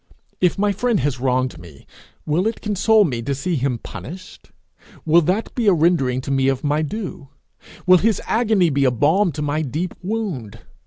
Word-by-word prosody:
If 180 +1 +2
my 205 +1 +2
friend 240 +2 0
has 135 -2 -1
wronged 130 0 0
me, 80 -6 -14 0.4
will 170 +7 +1
it 225 - -3
console 215 +1 +3
me 125 -10 -2
to 140 +4 -2
see 170 +6 -2
him 130 -3 -1
punished? 185 - -10 0.6
Will 165 +2 +5
that 185 +7 -1
be 235 -4 -1
a 200 - +6
rendering 150 -7 +2
to 135 - -5
me 135 -1 +2
of 135 -1 0
my 150 +1 +1
due? 155 -4 -5 0.6
Will 185 -1 +6
his 220 0 +1
agony 215 -7 +2
be 140 0 +1
a 130 - +5
balm 155 - +2
to 150 - -4
my 150 +1 -1
deep 155 +5 -3
wound? 180 - -4
155 Hz, 190 wpm, -20 LUFS, 135-195 Hz, 0.6 s, a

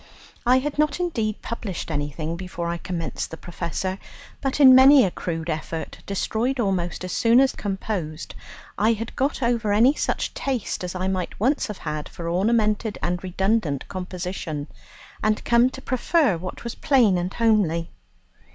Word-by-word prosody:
I 250 +1 +6
had 295 +3 -2
not 300 +1 +2
indeed 225 - -2
published 205 -7 -5
anything 150 +2 -3
before 175 -1 -5
I 170 - -2
commenced 170 -3 -4
"The 160 - -8
Professor," 180 +3 -4 0.4
but 270 +1 -1
in 265 -3 +9
many 265 0 +8
a 185 - -1
crude 165 -2 -4
effort, 160 0 -4
destroyed 225 +6 -1
almost 185 -6 -1
as 185 - -4
soon 230 +2 +4
as 270 0 +4
composed, 190 -6 -4 0.5
I 220 +3 +4
had 225 +1 -6
got 270 0 0
over 235 -3 +1
any 230 +7 +5
such - - -2
taste 255 -8 -3
as 180 0 -4
I 185 +1 -1
might 185 -2 -3
once 265 +8 +1
have 210 -3 -6
had 150 -1 -5
for 170 - -7
ornamented 210 +4 +1
and 175 +2 -1
redundant 185 -5 0
composition, 180 -5 -4 0.6
and 215 0 0
come 235 +1 +4
to 265 +1 -10
prefer 260 - +2
what 180 +2 -7
was 235 - -4
plain 255 -10 +3
and 180 +1 -2
homely. 200 -8 +1
200 Hz, 160 wpm, -24 LUFS, 175-240 Hz, 0.6 s, in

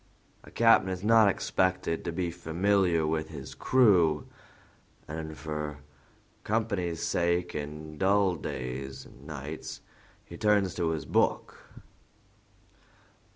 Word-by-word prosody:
"A - - -14
captain 115 -5 +4
is 95 0 -4
not 110 0 +6
expected 95 -3 0
to 85 - -2
be 85 0 -2
familiar 90 0 +1
with 80 0 -1
his - - -8
crew, 90 - +3 0.8
and 80 0 -6
for 75 -1 -4 0.7
company's 100 -7 -1
sake 85 0 0
in 75 +1 -6
dull 95 -1 +3
days 65 -2 -5
and 70 +4 -16
nights 75 0 -7 0.4
he - - -10
turns 105 -4 +2
to 85 -2 -1
his 80 -3 -3
book. - - 0
85 Hz, 110 wpm, -29 LUFS, 75-95 Hz, 0.8 s, not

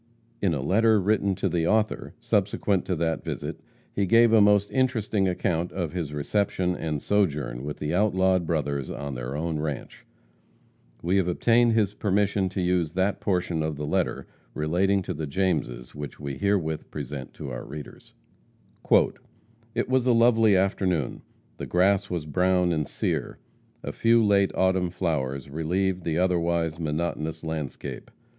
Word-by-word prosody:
In 90 -5 +2
a 65 - -3
letter 110 +6 +4
written 100 0 +1
to 95 - -1
the 85 -2 0
author, 110 0 0
subsequent 105 -4 0
to 90 - -1
that 80 0 -1
visit, - - -5 0.3
he 100 -1 0
gave 115 +3 +5
a 110 - +7
most 100 0 +4
interesting 110 -7 +1
account 90 -1 -1
of 85 -5 -3
his 85 -5 -3
reception 90 +4 0
and 75 -4 -3
sojourn 75 -10 0
with 75 +1 -5
the 75 +2 -3
outlawed 95 -3 +2
brothers 70 -4 -1
on 70 -1 -5
their 60 +2 -5
own 80 0 -2
ranche. 75 -3 -5 1.0
We 90 +4 +2
have 95 -3 +2
obtained 115 +6 +3
his 105 -3 +2
permission 100 -1 +1
to 95 +1 -3
use 90 -3 0
that 95 +2 0
portion 90 -4 0
of 80 -1 -2
the 75 +1 -4
letter - - -1 0.3
relating 95 +6 +1
to 90 - -4
the 80 -1 -4
Jameses, 70 -8 -1
which 75 -1 -7
we 70 -2 -5
herewith 95 -6 0
present 70 -3 -6
to 65 - -7
our - - -5
readers: 75 -2 -10 1.6
"It - - 0
was 130 0 +1
a 125 - +5
lovely 115 -3 +5
afternoon. 95 -7 0 0.4
The - - -6
grass 95 +2 +2
was 85 -4 -3
brown 90 +2 +2
and 75 -4 -1
sere. - - -2 0.5
A - - -3
few 115 -1 +3
late 100 -1 +4
autumn 95 -1 +2
flowers 75 -7 -2
relieved 90 +5 -1
the 80 -1 0
otherwise 85 -2 +1
monotonous 80 0 -3
landscape. 80 -4 -5
90 Hz, 155 wpm, -26 LUFS, 75-100 Hz, 1.6 s, a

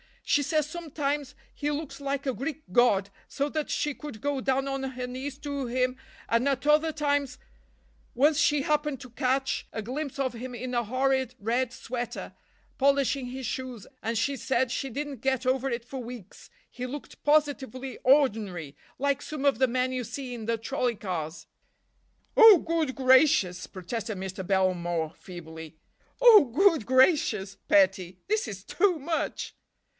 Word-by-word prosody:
She 290 - +2
says 305 +1 +1
sometimes 295 -3 -3 0.2
he 290 - -2
looks 295 0 -5
like 280 0 -3
a 265 - 0
Greek 290 +4 -5
god, 200 -3 +3 0.2
so 285 +1 -2
that 310 0 -3
she 295 - -1
could 290 -7 -9
go 285 0 -1
down 270 +1 +1
on 270 0 -2
her 260 -1 -4
knees 260 +2 -6
to 285 -2 -4
him, 255 +1 0 0.3
and 230 +4 +2
at 275 0 0
other 305 +2 +4
times—Once 65 - -2
she 295 -3 +3
happened 295 -2 0
to 255 - -10
catch 265 +2 -1
a 220 - -3
glimpse 270 +6 -5
of 265 -2 -1
him 245 +1 -7
in 250 +2 -5
a 240 -1 0
horrid 260 +1 0
red 235 +3 -1
sweater, 245 0 -5 0.4
polishing 275 -1 +2
his 260 +1 -6
shoes, 250 -3 -5 0.2
and 230 +1 -2
she 275 +5 0
said 260 +1 0
she 270 - -2
didn't 285 +2 -4
get 265 -1 0
over 260 +1 +1
it 235 -2 -3
for 260 +2 -7
weeks, 235 -5 -10 0.2
he 250 - -6
looked 285 +3 -8
positively 275 -4 +1
ordinary, 210 - +2 0.2
like 280 +1 0
some 300 -2 -6
of 280 -2 +3
the 260 - +4
men 255 +1 0
you 255 -2 -3
see 260 +1 -6
in 230 -3 -6
the 230 +1 0
trolley 245 +1 -1
cars." 175 -5 -5 0.9
"Oh, 450 -4 +10
good 320 -5 -1
gracious!" 260 - +4
protested 215 +3 -5
Mr. 190 0 -5
Belmore 175 -4 0
feebly. 160 -3 -10 0.5
"Oh, 450 -9 +9
good 315 - +3
gracious, 255 - +3
petty! 190 -2 +3
This 430 - +1
is 195 -3 -7
too 365 - +2
much." 320 +3 -3
260 Hz, 160 wpm, -27 LUFS, 225-285 Hz, 0.9 s, Oh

